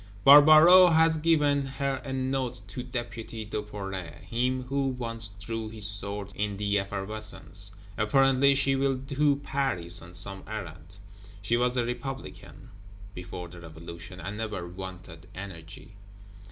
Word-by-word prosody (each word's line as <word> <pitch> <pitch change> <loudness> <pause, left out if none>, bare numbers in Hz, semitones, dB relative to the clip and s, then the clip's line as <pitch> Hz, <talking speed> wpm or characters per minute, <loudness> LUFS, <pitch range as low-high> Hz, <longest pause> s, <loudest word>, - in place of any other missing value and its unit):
Barbaroux 155 +6 +8
has 160 0 +3
given 150 -3 +2
her 135 0 -3
a 135 - -7
Note 130 -2 -3
to 125 - -6
Deputy 120 -3 -6
Duperret, 100 -4 -7
him 125 +2 -2
who 135 +2 -2
once 115 -4 +1
drew 110 +2 -6
his 110 -1 +1
sword 100 -1 +1
in 105 -1 -3
the 100 0 0
effervescence. 100 -1 -1 0.3
Apparently 135 +5 +3
she 135 0 +2
will 135 0 0
to 140 +1 +1
Paris 90 -14 0
on 90 +1 -9
some 95 +1 +5
errand? 95 -4 -9 0.5
"She 115 +4 +1
was 125 +1 0
a 120 - +1
Republican 130 +1 -8 0.4
before 90 -1 -8
the 85 0 -13
Revolution, 85 +2 -10
and 95 +5 -6
never 105 -5 -5
wanted 90 -1 -10
energy." 95 0 -10
110 Hz, 135 wpm, -27 LUFS, 95-135 Hz, 0.5 s, Barbaroux